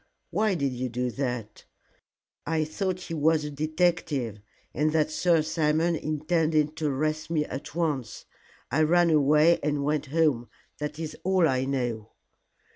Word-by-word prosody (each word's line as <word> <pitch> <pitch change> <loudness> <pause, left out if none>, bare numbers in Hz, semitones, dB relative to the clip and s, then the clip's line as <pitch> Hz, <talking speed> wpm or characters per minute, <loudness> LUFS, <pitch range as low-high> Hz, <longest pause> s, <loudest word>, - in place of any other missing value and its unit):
"Why 215 -3 +1
did 140 -5 -1
you 125 +1 -3
do 125 +1 -2
that?" 125 -5 -4 0.8
"I 160 0 +1
thought 185 +4 -3
he 165 - -6
was 155 0 +2
a 150 - -5
detective, 150 - 0 0.3
and 155 +1 +1
that 155 -1 +2
Sir 165 0 +2
Simon 160 +1 +1
intended 155 0 0
to 155 -2 -1
arrest 155 +3 -1
me 155 -3 +1
at 140 +2 -7
once. 145 -10 -2 0.5
I 155 - +2
ran 170 +2 +4
away 150 +3 +4
and 145 -1 -1
went 150 0 -1
home. 145 -5 +1 0.3
That 150 0 -4
is 160 -1 -5
all 185 -2 +3
I 130 -2 0
know." 120 -5 -3
155 Hz, 150 wpm, -27 LUFS, 140-160 Hz, 0.8 s, ran